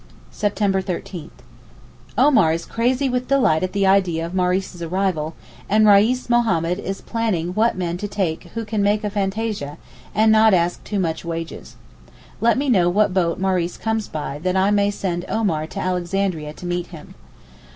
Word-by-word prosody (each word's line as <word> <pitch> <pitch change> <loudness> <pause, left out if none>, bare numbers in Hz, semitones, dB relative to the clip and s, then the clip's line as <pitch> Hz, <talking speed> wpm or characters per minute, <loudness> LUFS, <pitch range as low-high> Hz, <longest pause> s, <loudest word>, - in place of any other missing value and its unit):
September 200 -2 0
13.—Omar 130 - -2
is 165 - -3
crazy 250 +4 0
with 250 0 -1
delight 250 -13 +3
at 185 0 -1
the 200 -1 +1
idea 185 -4 +2
of 170 - -7
Maurice's 180 -1 -1
arrival, 170 -3 -1 0.3
and 215 +1 +4
Reis 215 +5 +4
Mohammed 200 -8 +1
is 195 -1 -5
planning 215 -8 -1
what 215 +3 +1
men 175 -1 -2
to 205 - -4
take 190 -5 -2
who 230 -1 -3
can 210 -1 -1
make 205 +1 +2
fantasia, 205 -6 -2 0.4
and 220 +1 +4
not 220 -2 +6
ask 175 0 0
too 205 - -3
much 165 -3 -2
wages. 165 -1 -6 0.6
Let 235 +2 +3
me 285 +2 -1
know 185 -9 +4
what 205 +1 +2
boat 170 -3 +1
Maurice 185 -2 0
comes 220 -1 -2
by 145 -2 -5
that 185 +3 -1
I 195 +2 +3
may 205 -1 +3
send 180 -4 -3
Omar 165 -9 0
to 195 - -7
Alexandria 180 -3 -2
to 180 - -11
meet 175 0 -2
him. 160 -4 -12
190 Hz, 165 wpm, -21 LUFS, 170-215 Hz, 0.6 s, not